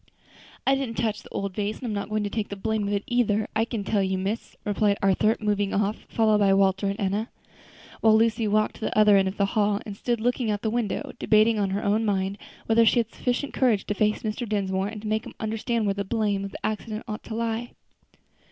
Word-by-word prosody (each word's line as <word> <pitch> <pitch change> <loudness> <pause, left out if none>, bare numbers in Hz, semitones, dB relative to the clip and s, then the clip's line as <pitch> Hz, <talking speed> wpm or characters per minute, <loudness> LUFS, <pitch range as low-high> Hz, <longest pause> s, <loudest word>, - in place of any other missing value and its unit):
"I 270 - +4
didn't 270 -4 -2
touch 220 -2 -1
the - - -15
old 195 -1 -3
vase, 210 +2 -2
and - - -8
I'm 225 - -2
not 200 +1 -3
going 215 0 0
to 205 - -2
take 215 -1 -2
the 200 - -5
blame 215 +1 -1
of 205 - -1
it, 200 - -2
either, 220 -4 +1
I 220 +1 +2
can 230 -3 -4
tell 205 0 +1
you, 190 0 0
miss," 195 +4 -3
replied 205 -1 +2
Arthur, 200 +3 +2
moving 205 -2 0
off, 205 +1 -1
followed 215 -2 +3
by 195 -1 +4
Walter 195 0 +2
and 200 +1 -2
Enna, 205 +3 -1 0.7
while 220 -1 +5
Lucy 225 0 +2
walked 215 +1 +1
to - - -18
the - - -2
other 210 -1 +6
end 195 -1 +4
of 190 - -4
the 200 - +3
hall, 205 -2 +2
and 205 - -6
stood 240 +3 -1
looking 245 0 0
out 210 - +2
of 205 - -8
the 220 - 0
window, 230 -4 -2
debating 220 +1 +4
in 200 -2 +1
her 195 +2 -2
own 210 +2 +2
mind 195 -1 -1 0.3
whether 225 +1 +4
she 230 - +4
had 230 -1 +1
sufficient 250 +3 -2
courage 235 -7 +2
to - - -1
face 210 +1 0
Mr. 215 +1 -3
Dinsmore, 195 -2 0
and 210 0 -7
make 215 +1 0
him - - -10
understand 225 +1 -1
where 200 - +1
the 200 0 -3
blame 205 -1 0
of 200 - -5
the - - -7
accident 215 0 -3
ought 215 0 -5
to 220 - -5
lie. 230 +1 -2
215 Hz, 245 wpm, -25 LUFS, 200-225 Hz, 0.7 s, other